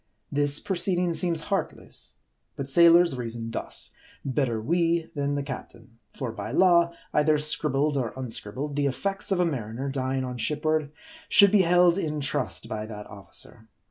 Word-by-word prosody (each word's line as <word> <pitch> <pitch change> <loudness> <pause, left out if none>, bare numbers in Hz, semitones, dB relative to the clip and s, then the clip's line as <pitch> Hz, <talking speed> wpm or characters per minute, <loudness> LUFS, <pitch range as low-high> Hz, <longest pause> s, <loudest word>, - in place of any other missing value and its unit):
This 145 0 +2
proceeding 180 -2 +1
seems 165 0 +1
heartless. - - -5 0.4
But 140 - -5
sailors 170 +1 +6
reason 115 -2 -5
thus: - - -6 0.3
Better 130 -4 0
we, 165 +6 0
than 145 -1 -1
the 145 - -2
captain. 115 -3 -9
For 125 0 -5
by 115 - -6
law, 170 -2 +4 0.2
either 150 0 +3
scribbled 150 -1 0
or 120 -4 -1
unscribbled, 130 +3 -4
the 145 -1 +1
effects 195 +9 -2
of 190 - +2
a 180 - +3
mariner, 130 -3 -3
dying 135 -1 -2
on 125 -1 -5
shipboard, 155 +4 0 0.4
should 200 -2 +6
be 210 -2 +5
held 175 +1 +4
in 150 -4 -2
trust 135 - -2
by 110 0 -5
that 105 -1 -8
officer. 100 +2 -9
145 Hz, 155 wpm, -26 LUFS, 125-170 Hz, 0.4 s, sailors